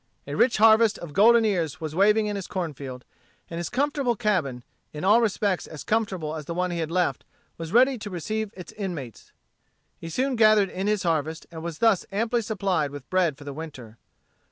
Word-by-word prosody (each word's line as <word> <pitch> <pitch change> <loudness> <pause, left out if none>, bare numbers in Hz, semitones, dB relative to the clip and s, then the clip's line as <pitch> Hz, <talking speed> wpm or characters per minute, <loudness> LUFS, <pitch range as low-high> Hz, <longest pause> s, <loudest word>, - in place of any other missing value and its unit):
A 145 - -6
rich 235 - +3
harvest 220 0 +5
of 165 -4 -9
golden 225 +4 +6
ears 175 -8 -1
was 155 -2 -5
waving 210 +5 +4
in 210 -1 -2
his 195 -2 -5
corn 175 -5 -3
field; 130 -2 -8 0.5
and 165 - -4
his 170 - -3
comfortable 275 -2 0
cabin, 175 - -1 0.3
in 150 - -7
all 210 +5 +5
respects 205 -4 0
as 155 - -9
comfortable 190 -8 -1
as 155 -2 -6
the 170 - -5
one 180 0 -1
he 170 - -3
had 160 -1 -2
left, 180 +1 0 0.4
was 165 -1 -6
ready 250 +3 +4
to 210 - -6
receive 215 +4 -3
its 180 - -9
inmates. 170 - -7 0.7
He 165 - -7
soon 260 - 0
gathered 215 -3 +5
in 190 +2 -3
his 210 -2 +1
harvest, 160 -1 -1
and 165 -1 -8
was 165 -1 -5
thus 225 -5 +3
amply 230 +4 0
supplied 195 -8 -1
with 140 -2 -10
bread 175 -6 +2
for 145 - -12
the 145 -1 -6
winter. 130 -8 -9
185 Hz, 205 wpm, -25 LUFS, 160-215 Hz, 0.7 s, golden